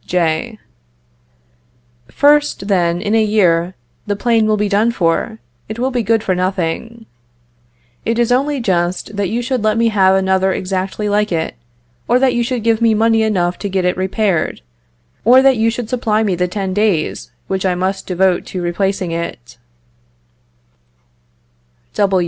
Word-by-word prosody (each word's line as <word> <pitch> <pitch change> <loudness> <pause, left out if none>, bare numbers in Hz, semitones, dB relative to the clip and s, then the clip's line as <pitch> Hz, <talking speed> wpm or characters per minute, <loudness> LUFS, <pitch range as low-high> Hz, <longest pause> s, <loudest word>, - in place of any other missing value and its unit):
J. 175 +6 -1 1.5
First, 290 - +2
then, 175 -3 +1
in 210 +1 -1
a 225 -1 +4
year, 185 -5 +2 0.3
the 205 - 0
plane 225 0 +1
will 215 0 +2
be 210 0 0
done 215 +3 +2
for, 190 +3 -1 0.3
it 220 - -5
will 255 +2 -1
be 245 -1 0
good 225 0 +1
for 190 - 0
nothing. 185 +5 -3 1.0
It 230 0 -1
is 240 0 +1
only 280 +3 +1
just, 185 -1 -1
that 200 -2 -1
you 240 +2 -2
should 255 -2 -2
let 215 0 +1
me 230 0 +3
have 190 -3 +3
another 190 0 +1
exactly 190 +2 -3
like 210 0 0
it; 165 -1 -2 0.5
or 245 - +3
that 260 -1 +2
you 240 - 0
should 245 -1 -3
give 230 0 +1
me 225 -1 +3
money 225 +1 +3
enough 180 -5 0
to 200 - -4
get 190 -1 -1
it 180 - +1
repaired; 190 - -1 0.6
or 255 +4 +6
that 270 -2 +4
you 225 +1 +2
should 235 0 -4
supply 225 -3 0
me 200 -3 0
the 180 +1 0
ten 190 0 -3
days 205 -6 0 0.2
which 190 0 -3
I 185 -2 +1
must 190 +2 -2
devote 185 0 +1
to 185 - -5
replacing 185 +1 -1
it. 125 -8 -6
205 Hz, 160 wpm, -17 LUFS, 185-230 Hz, 1.5 s, or